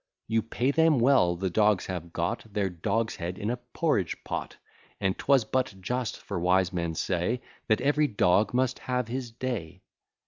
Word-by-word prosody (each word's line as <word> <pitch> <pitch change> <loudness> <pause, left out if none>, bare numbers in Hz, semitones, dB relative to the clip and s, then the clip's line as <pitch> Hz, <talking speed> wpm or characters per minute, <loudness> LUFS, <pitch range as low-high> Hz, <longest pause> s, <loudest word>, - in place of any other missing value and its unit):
You 115 0 +2
pay 120 +4 0
them 160 -1 +4
well, 120 -8 +4
the 95 +1 -2
dogs 105 -1 +3
have 85 -2 -5
got 85 +6 -3
Their 100 -2 0
dogs 110 +6 -1
head 90 +1 -4
in 105 +2 -2
a 125 - -2
porridge 120 - -1
pot: - - -4 0.4
And 95 0 +1
'twas 135 -5 +3
but 130 -6 -1
just; 120 +4 -2
for 100 - -3
wise 90 +1 +2
men 85 -2 -2
say, 90 +9 0 0.3
That 110 -2 +2
every 145 +2 +3
dog 100 -2 +3
must 130 +1 +1
have 125 -2 -2
his 125 0 -3
day. 115 -8 -5
110 Hz, 175 wpm, -28 LUFS, 90-125 Hz, 0.4 s, them